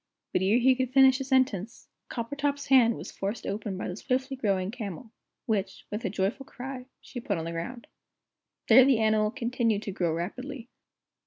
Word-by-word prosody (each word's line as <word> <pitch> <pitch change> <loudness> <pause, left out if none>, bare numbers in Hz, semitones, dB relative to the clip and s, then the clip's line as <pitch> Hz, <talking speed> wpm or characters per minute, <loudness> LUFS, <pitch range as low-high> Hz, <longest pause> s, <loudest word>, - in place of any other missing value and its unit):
But - - +2
ere 195 +5 +3
he 255 +2 +5
could 255 -1 -2
finish 265 0 +6
a - - -2
sentence, 255 -6 0 0.2
Coppertop's 280 +4 -2
hand 240 -4 +6
was - - -8
forced 200 +4 -4
open 200 -1 -3
by - - -4
the 180 - -4
swiftly 260 +4 -2
growing 195 -6 0
camel, 220 -1 -7 0.3
which, 200 -5 -2
with 210 +3 -4
a 195 - -1
joyful 200 +7 -1
cry, 255 0 -8
she 250 - -8
put 200 -5 -2
on 165 - -4
the 165 - -4
ground. 205 +9 -6 0.8
There 250 +3 +8
the 265 -2 +4
animal 215 -1 +2
continued 230 -2 -1
to 200 - -4
grow 175 -3 0
rapidly. 245 - -5
230 Hz, 180 wpm, -28 LUFS, 200-260 Hz, 0.8 s, There